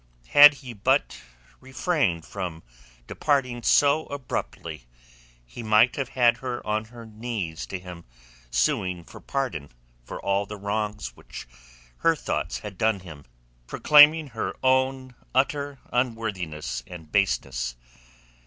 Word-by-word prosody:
Had 145 0 +9
he 125 - -6
but 105 - 0 0.4
refrained 130 - -1
from 85 -3 -6 0.4
departing 130 - 0
so 145 +5 +3
abruptly 85 - -5 0.6
he - - -9
might 110 +2 +4
have 135 -3 -3
had 120 -1 +5
her 125 0 -5
on 110 +1 -1
her 115 +1 -12
knees 105 -8 -5
to 95 - -4
him 90 -2 -11 0.4
suing 85 +9 0
for - - -13
pardon 120 - -3 0.3
for - - -8
all 100 +1 0
the 105 - -7
wrongs 105 +1 -3
which - - -10 0.5
her 165 0 +3
thoughts 90 - -3
had 100 -3 -9
done 110 -3 +1
him, 80 -6 -12 0.4
proclaiming 150 0 +6
her - - -4
own 130 0 +1 0.2
utter 140 +1 0 0.2
unworthiness 105 - -2
and 80 -4 -11
baseness. 65 -11 0
110 Hz, 125 wpm, -25 LUFS, 90-130 Hz, 0.6 s, Had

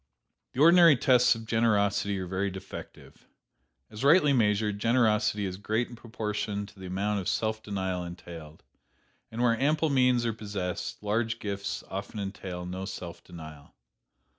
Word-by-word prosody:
"The 130 - -1
ordinary 170 -1 +8
tests 125 0 +4
of 115 0 -8
generosity 100 -3 +1
are 95 - -3
very 95 +2 -1
defective. 95 +1 -10 0.6
As 105 - -7
rightly 150 0 +5
measured, 105 -3 +1
generosity 110 -3 +2
is 95 -1 -4
great 110 +4 -1
in 120 - -10
proportion 105 -3 -4
to 100 -1 -16
the 95 - -7
amount 100 +3 -1
of 95 - -2
self 110 0 -1
denial 95 -4 -3
entailed; 85 -3 -10 0.7
and 115 +2 -3
where 115 -2 +3
ample 155 +2 +2
means 125 -3 +3
are 115 - 0
possessed, 100 -3 -5
large 115 +2 0
gifts 100 -2 -4
often 100 +2 -6
entail 95 -3 -5
no 95 +1 -5
self 90 -3 -7
denial. 80 -4 -12
105 Hz, 150 wpm, -28 LUFS, 95-115 Hz, 0.7 s, ordinary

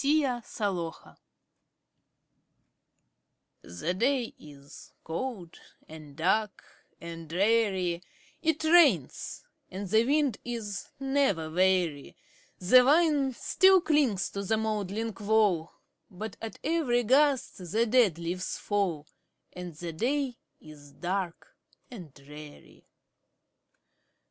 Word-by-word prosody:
THE 295 +1 +3 0.4
RAINY 175 -5 -1
DAY. - - -19 2.5
The 90 - -3
day 245 +4 0
is 145 -1 -14
cold, 180 0 -5 0.3
and 155 -2 -12
dark, 195 +6 0 0.4
and 165 -1 -9
dreary; 190 -2 +1 0.4
It 320 -1 0
rains, 310 - +3 0.3
and 195 +2 -6
the 220 +4 +3
wind 280 -3 +1
is 225 -5 -5
never 270 - 0
weary; 180 -4 +1 0.4
The 230 +8 +6
vine 290 -2 +3
still 380 +7 +4
clings 280 - +1
to 200 - -4
the 220 +3 0
moldering 215 0 -2
wall, 205 -6 +2 0.4
But 200 +2 -7
at 225 -2 -7
every 280 -6 +1
gust 270 +1 +2
the 230 +2 +2
dead 225 -7 +3
leaves 175 +2 -4
fall, 190 -8 -1 0.5
And 180 -3 -8
the 170 +1 -6
day 255 - -1 0.2
is 145 -2 -15
dark 185 - -4 0.4
and 180 - -10
dreary. 145 +2 -14
205 Hz, 105 wpm, -28 LUFS, 170-255 Hz, 2.5 s, The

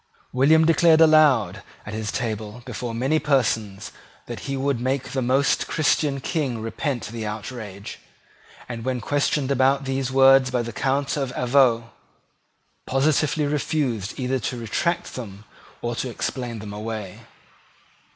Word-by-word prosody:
William 155 +5 +5
declared 165 0 +5
aloud 150 - +5 0.2
at 105 - -7
his 110 -1 -3
table 110 0 -4
before 120 -1 -5
many 135 +7 +1
persons 110 -9 0 0.3
that - - -6
he 135 - -1
would 135 -2 0
make 135 +1 -1
the 135 - -1
most 130 +3 +2
Christian 145 -2 +1
King 135 -5 -2
repent 120 +3 -3
the 115 0 -6
outrage, 105 -2 -7 0.7
and, 115 -2 -6
when 130 0 -1
questioned 140 +1 0
about 135 +1 +2
these 135 -1 -2
words 135 0 +6
by 125 -1 0
the 115 -1 -6
Count 135 +3 0
of 135 -3 -2
Avaux, 120 -3 +3 1.0
positively 150 +2 +1
refused 140 - -2
either 130 +1 0
to 125 +3 -3
retract 170 +10 -2
them 105 -4 -8 0.4
or 120 0 -2
to 130 - -3
explain 120 0 -4
them 105 -1 -8
away. 105 -2 -6
130 Hz, 140 wpm, -23 LUFS, 115-140 Hz, 1.0 s, words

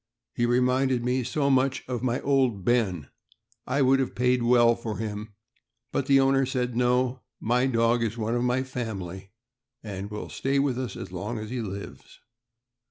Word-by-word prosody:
He 120 - +1
reminded 125 0 +2
me 125 +1 +1
so 140 +3 0
much 135 0 +2
of 125 -2 -3
my 125 -1 0
Old 130 -9 +1
Ben, 100 - +1 0.6
I 140 +2 +2
would 135 +1 +4
have 130 - -2
paid 125 0 +2
well 120 -1 +5
for 110 -3 -5
him, 105 -1 -5 0.6
but 135 - -1
the 135 -1 +6
owner 135 0 +3
said: 125 -2 -2
"No, 125 +1 +1 0.2
my 125 +3 +1
dog 115 -1 +2
is 115 0 -2
one 110 0 -1
of 120 - 0
my 125 +1 +1
family, 100 -7 -6 0.5
and 100 -2 -6
will 105 0 -6
stay 135 +1 -1
with 135 -3 +1
us 130 -2 -4
as 95 - -7
long 105 +6 -4
as 110 +1 -6
he 125 -1 -2
lives." 100 -2 -8
125 Hz, 175 wpm, -26 LUFS, 110-130 Hz, 0.6 s, the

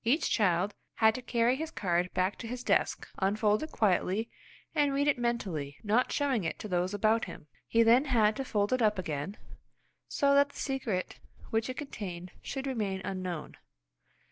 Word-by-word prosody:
Each 265 +8 +2
child 190 -1 +2 0.2
had 220 -1 +5
to 255 - -5
carry 240 0 +2
his 320 +2 -3
card 180 - 0
back 185 +2 +1
to 230 - -6
his 250 +1 -5
desk, - - +1
unfold 210 +2 +2
it 310 - -5
quietly, 205 +2 +1 0.4
and 295 -3 +2
read 285 +1 +2
it 285 -4 +2
mentally, 180 -13 -2
not 225 +4 +2
showing 270 -8 +1
it 165 - -2
to - - -6
those 180 +1 0
about 220 +2 +2
him. 170 -4 -10 0.2
He 230 0 +4
then 240 +5 +5
had 220 -6 +3
to 270 - -2
fold 210 -2 0
it 255 - +1
up 210 -2 +3
again, 160 +2 -4 0.7
so 280 0 +2
that 280 0 +5
the - - -19
secret 240 -9 -2 0.3
which 225 +2 0
it 255 - -5
contained 185 - -6
should 270 -1 -5
remain 210 -8 -2
unknown. 185 -4 -4
220 Hz, 180 wpm, -30 LUFS, 185-255 Hz, 0.7 s, had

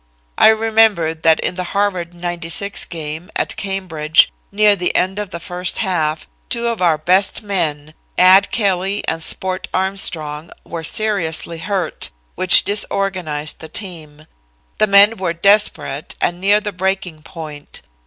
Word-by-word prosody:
I - - +7
remember 220 -6 +3
that 160 0 +2
in - - -2
the 180 0 -4
Harvard 185 -4 -1
'96 175 +3 -2
game, 160 0 -7
at - - -1
Cambridge, 180 -5 +1 0.2
near 210 0 +4
the 180 -2 -2
end 190 +3 0
of 210 -2 -5
the 170 - -7
first 180 0 -3
half, 160 -6 -1 0.2
two 235 -1 -1
of 230 -4 -4
our 165 -3 +3
best 185 +7 +1
men 155 -7 -3 0.2
(Ad 190 +2 +6
Kelly 195 -2 -1
and 165 0 -1
Sport 185 +3 +1
Armstrong) 165 -5 -2 0.2
were 165 -1 -6
seriously 170 -4 -1
hurt, 190 -3 -3 0.2
which 185 -1 +6
disorganized 185 -7 -1
the 160 - -10
team. 155 -6 -9 0.5
The 215 - +4
men 200 +3 +6
were 185 -3 -2
desperate 195 -6 +1
and 175 +1 -1
near 205 +2 +4
the 205 -1 -5
breaking 185 -3 -3
point. 155 -3 -10
180 Hz, 145 wpm, -17 LUFS, 160-200 Hz, 0.5 s, I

